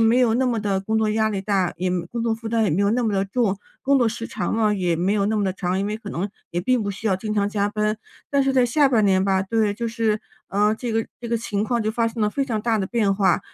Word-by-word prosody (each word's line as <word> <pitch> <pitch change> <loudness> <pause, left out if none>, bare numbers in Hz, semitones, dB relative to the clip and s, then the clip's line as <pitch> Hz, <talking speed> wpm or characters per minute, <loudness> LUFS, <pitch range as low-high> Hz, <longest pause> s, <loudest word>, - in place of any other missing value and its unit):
没 225 +2 +4
有 240 -3 +3
那 260 +2 +2
么 240 -3 0
的 200 -2 0
工 220 +3 0
作 215 -1 +1
压 220 0 +2
力 200 -2 -2
大， 190 -3 0
也 185 +1 -1 0.2
工 235 - -3
作 230 -1 +1
负 225 0 -7
担 225 -1 +2
也 - - +1
没 185 +7 +1
有 200 - +3
那 240 +2 +1
么 215 - 0
的 195 0 +1
重， 205 -1 0 0.2
工 280 +1 +3
作 240 -3 +3
时 230 0 -5
长 - - -2
了 215 -2 +2
也 175 -4 0
没 185 +4 +1
有 200 -2 +1
那 220 - 0
么 205 - +1
的 190 - 0
长， 185 0 -2
因 200 - -1
为 210 +1 -2
可 210 -3 -9
能 190 +5 -2 0.2
也 175 - -1
并 255 +1 +2
不 205 - -2
需 200 +3 -6
要 195 - +3
经 210 +3 -4
常 200 -1 +2
加 205 -1 0
班。 215 +1 -1 0.3
但 280 -1 +3
是 270 0 +1
在 255 -2 +5
下 275 +4 +3
半 225 -5 +3
年 190 -2 +3
吧 190 -1 +2
对， 210 0 0
就 235 +2 -3
是， 225 -2 0 0.3
呃， 210 +2 +2
这 240 +1 -4
个 225 0 0
这 235 - -6
个 235 - +1
情 210 -3 -2
况 235 0 0
就 215 - 0
发 230 +1 +1
生 225 -1 -4
了 210 - +2
非 275 +6 -1
常 235 -5 -2
大 225 -1 +1
的 195 - -1
变 210 -3 +1
化， 195 0 +2
215 Hz, 330 characters per minute, -23 LUFS, 200-230 Hz, 0.3 s, 在